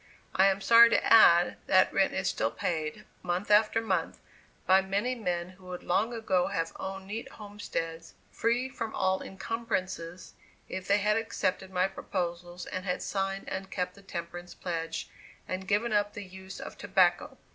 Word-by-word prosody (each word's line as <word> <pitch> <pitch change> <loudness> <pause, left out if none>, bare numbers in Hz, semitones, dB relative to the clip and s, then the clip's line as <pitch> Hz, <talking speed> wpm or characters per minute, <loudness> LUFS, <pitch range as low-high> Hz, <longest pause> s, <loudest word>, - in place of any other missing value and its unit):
I 190 - +5
am 195 0 +1
sorry 230 +3 +8
to - - +2
add, 175 -6 +7
that 185 -1 +4
rent 195 -1 +3
is 190 -1 -1
still 110 -10 0
paid, 155 +2 -3 0.2
month 180 +3 -2
after 215 +1 +5
month, 225 - -1 0.5
by 190 +1 +6
many 200 +6 -1
men 180 -7 -2
who 185 0 -17
would 180 -1 -7
long 205 +6 +1
ago 195 -6 +1
have 165 0 -2
owned 190 0 -5
neat 215 +4 -6
homesteads, 165 -6 -6 0.2
free 240 +3 0
from 230 -4 -5
all 190 0 +1
incumbrances, 190 -5 -4 0.3
if 190 0 -6
they 200 - +4
had 210 +1 +2
accepted 195 -4 -2
my 185 0 +1
proposals 175 -2 -4
and 185 - -5
had 180 -2 -2
signed 195 0 -2
and 190 0 -5
kept 180 -1 -2
the 200 - -16
temperance 175 -2 -7
pledge, 165 -2 -4 0.4
and 185 +1 -4
given 215 +3 +1
up 205 0 +1
the 205 - -7
use 190 +1 -10
of - - -9
tobacco. 195 +7 +2
190 Hz, 170 wpm, -29 LUFS, 180-205 Hz, 0.5 s, sorry